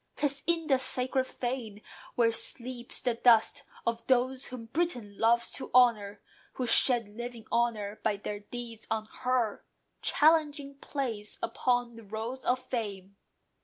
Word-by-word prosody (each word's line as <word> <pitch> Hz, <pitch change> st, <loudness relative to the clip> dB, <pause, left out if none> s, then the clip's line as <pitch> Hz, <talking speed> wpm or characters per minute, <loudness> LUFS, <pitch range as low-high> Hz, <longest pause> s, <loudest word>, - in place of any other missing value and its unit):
'Tis 280 Hz, -1 st, -1 dB
in 335 Hz, -1 st, +2 dB
the 270 Hz, -4 st, +3 dB
sacred 260 Hz, 0 st, 0 dB
fane 240 Hz, -6 st, -4 dB, 0.4 s
where 230 Hz, -1 st, +4 dB
sleeps 245 Hz, +1 st, -2 dB
the 245 Hz, -, +1 dB
dust 235 Hz, +4 st, +4 dB, 0.2 s
Of 235 Hz, 0 st, -2 dB
those 255 Hz, +1 st, +2 dB
whom 250 Hz, -3 st, -7 dB
Britain 245 Hz, -7 st, -2 dB
loves 235 Hz, +1 st, +3 dB
to -, -, -5 dB
honour, 210 Hz, -5 st, +4 dB, 0.3 s
who 255 Hz, -, -2 dB
Shed 235 Hz, -1 st, +4 dB
living 235 Hz, +1 st, -7 dB
honour 215 Hz, -3 st, 0 dB
by 205 Hz, -, +1 dB
their 205 Hz, +1 st, -5 dB
deeds 230 Hz, +1 st, -7 dB
on 220 Hz, -1 st, -1 dB
her, 250 Hz, -4 st, 0 dB, 0.4 s
Challenging 295 Hz, -3 st, +2 dB
place 230 Hz, -9 st, -4 dB
upon 245 Hz, 0 st, 0 dB
the 230 Hz, -, -11 dB
rolls 220 Hz, +5 st, -5 dB
of 250 Hz, -, +3 dB
Fame. 205 Hz, -7 st, -5 dB
240 Hz, 140 wpm, -30 LUFS, 220-260 Hz, 0.4 s, where